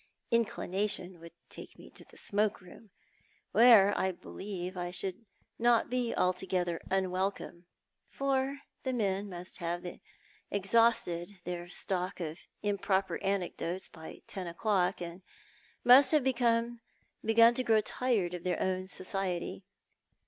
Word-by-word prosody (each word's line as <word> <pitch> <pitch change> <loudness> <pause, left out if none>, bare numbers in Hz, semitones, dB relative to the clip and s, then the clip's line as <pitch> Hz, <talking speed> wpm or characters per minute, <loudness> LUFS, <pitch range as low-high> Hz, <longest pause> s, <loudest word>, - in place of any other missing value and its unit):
Inclination 200 -5 0
would 170 0 -12
take - - -10
me - - -14
to - - -12
the - - -17
smoke 205 0 0
room, 190 +4 -15 0.6
where 225 -4 +7
I 190 - +1
believe 185 0 -7
I 175 -1 -3
should 185 +1 -3
be 230 - -29 0.3
not 240 +1 +3 0.2
altogether 180 -2 0
unwelcome; 185 -2 -2 0.4
for 275 0 -1 0.2
the 260 - -2
men 200 -3 -1
must 180 0 -8
have 175 0 -3 0.6
exhausted 200 -3 +2
their 175 0 -5
stock 185 +1 0
of 160 -1 -5 0.2
improper 200 -1 0
anecdotes 185 -2 -2
by 160 -1 -11
ten 185 -2 -6
o'clock, 180 0 0
and 170 +2 -8 0.6
must 255 +3 +8
have 300 -3 +4
begun 235 -2 +1 0.5
to 230 +2 +5
grow 220 -3 +4
tired 210 -7 0
of 175 -1 -6
their 180 - -1
own 185 0 -1
society. 185 -2 -3
195 Hz, 125 wpm, -31 LUFS, 180-230 Hz, 0.6 s, must